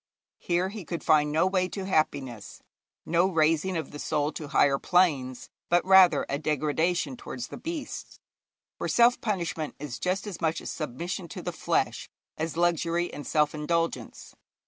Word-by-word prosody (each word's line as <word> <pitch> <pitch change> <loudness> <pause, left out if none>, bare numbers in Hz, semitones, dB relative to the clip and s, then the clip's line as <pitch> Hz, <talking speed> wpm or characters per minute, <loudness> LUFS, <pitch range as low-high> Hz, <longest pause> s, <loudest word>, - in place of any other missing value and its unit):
Here 180 +2 0
he 205 -1 -7
could 170 0 -5
find 150 -1 +4
no 155 +4 +3
way 185 -1 +1
to 195 -2 -5
happiness, 135 - -2 0.4
no 170 +3 +3
raising 165 +2 +2
of 160 - -4
the 145 - -8
soul 150 +1 0
to 155 - -7
higher 140 -1 +3
planes, 145 -9 +1 0.2
but, 175 0 +3
rather, 185 -6 +6
a 140 - -2
degradation 155 0 0
towards 125 0 -7
the - - -7
beasts. 330 -3 -6 0.6
For - - -2
self 240 +1 +4
punishment 170 -7 -2
is 140 -4 -6
just 185 +3 -1
as 200 -5 -7
much 160 0 +1
a - - -12
submission 170 +5 -4
to - - -8
the - - -3
flesh - - -1 0.3
as 160 0 -4
luxury 175 0 +1
and 145 - -7
self 150 -1 +2
indulgence. 165 +2 -2
165 Hz, 165 wpm, -27 LUFS, 150-180 Hz, 0.6 s, rather